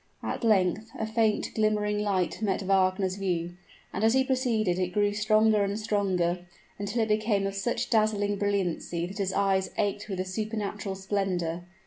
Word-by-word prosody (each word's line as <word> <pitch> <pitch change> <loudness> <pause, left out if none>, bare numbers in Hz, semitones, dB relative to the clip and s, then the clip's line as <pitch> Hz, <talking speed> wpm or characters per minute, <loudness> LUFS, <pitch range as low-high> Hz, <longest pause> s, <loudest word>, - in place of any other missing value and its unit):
At - - -3
length, 210 0 +2
a 220 - -1
faint, 220 -1 +1
glimmering 210 -1 +1
light 195 -2 0
met 200 -2 0
Wagner's 190 0 +2
view; 175 -3 -2 0.4
and 195 - -2
as 225 +3 +4
he 265 - +4
proceeded 235 -8 +1
it 180 -1 -1
grew 205 0 +2
stronger 215 0 +3
and 200 +1 -1
stronger, 180 -5 0 0.3
until 205 +3 0
it - - -1
became 210 -2 +1
of 195 - -2
such 195 +4 -2
dazzling 210 -2 +2
brilliancy 185 -4 -1
that 190 +3 -8
his 195 -1 0
eyes 195 -1 +1
ached 205 +1 -1
with 190 - -3
the 185 - -2
supernatural 205 0 -3
splendor. 185 -3 -2
200 Hz, 165 wpm, -28 LUFS, 185-215 Hz, 0.4 s, as